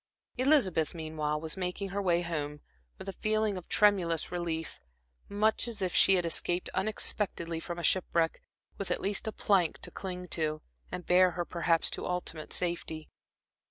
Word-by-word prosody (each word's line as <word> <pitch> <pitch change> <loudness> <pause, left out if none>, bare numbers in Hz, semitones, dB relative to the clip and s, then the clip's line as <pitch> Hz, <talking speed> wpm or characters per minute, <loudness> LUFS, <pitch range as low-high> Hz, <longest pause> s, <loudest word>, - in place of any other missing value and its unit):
Elizabeth, 240 - +3
meanwhile, 155 -2 -2
was 160 0 -4
making 190 +1 -3
her 200 +2 -2
way 175 -3 +2
home, 150 -3 -3 0.4
with - - -9
a 195 - -3
feeling 215 0 0
of 180 - -8
tremulous 180 -6 +3
relief, 170 -2 -3 0.5
much 215 +3 +3
as 235 -2 -4
if 185 -2 -1
she 195 - +6
had 175 -2 +1
escaped 175 +1 0
unexpectedly 190 -4 -1
from 175 +1 -5
shipwreck, 170 -3 +1 0.4
with 200 - -3
at - - 0
least 200 +2 -1
a - - 0
plank 190 -6 +2
to - - -7
cling 180 -1 -6
to, 155 -2 -1 0.3
and 180 - -5
bear 185 +1 +6
her 175 - -1
perhaps 170 -1 +1
to - - -4
ultimate 175 -3 -4
safety. 170 -3 -2
180 Hz, 160 wpm, -31 LUFS, 165-195 Hz, 0.5 s, she